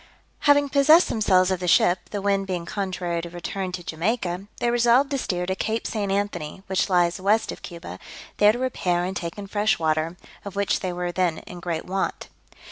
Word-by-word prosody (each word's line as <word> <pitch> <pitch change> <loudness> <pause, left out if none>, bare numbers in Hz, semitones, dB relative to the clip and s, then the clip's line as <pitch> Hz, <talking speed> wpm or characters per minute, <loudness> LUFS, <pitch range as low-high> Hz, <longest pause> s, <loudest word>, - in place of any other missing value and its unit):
Having 285 0 +5
possessed 300 +5 +5
themselves 190 -4 +3
of 185 - 0
the 180 - -3
ship, 175 +1 +3
the 205 -2 -4
wind 195 -1 +1
being 180 -3 -3
contrary 180 -3 -3
to 170 - -7
return 180 +2 -4
to 180 -1 -5
Jamaica, 180 +2 -2
they 240 - +1
resolved 240 +4 +4
to 280 - +1
steer 180 -6 -2
to 190 - -1
Cape 220 +3 -2
St. 205 -3 -2
Anthony 195 -4 -3
(which 190 +1 0
lies 175 0 +2
west 210 +4 +2
of - - -9
Cuba), 170 -1 -8 0.4
there 210 0 +6
to 230 - -4
repair 185 -9 0
and 185 +2 -3
take 170 -1 -4
in 205 - -6
fresh 205 +2 +1
water, 160 +2 0 0.3
of 200 -1 -8
which 200 0 +1
they 185 - -3
were 175 0 -3
then 175 -2 0
in 180 - -9
great 170 -2 -3
want. 190 +1 -3
190 Hz, 205 wpm, -24 LUFS, 175-210 Hz, 0.4 s, there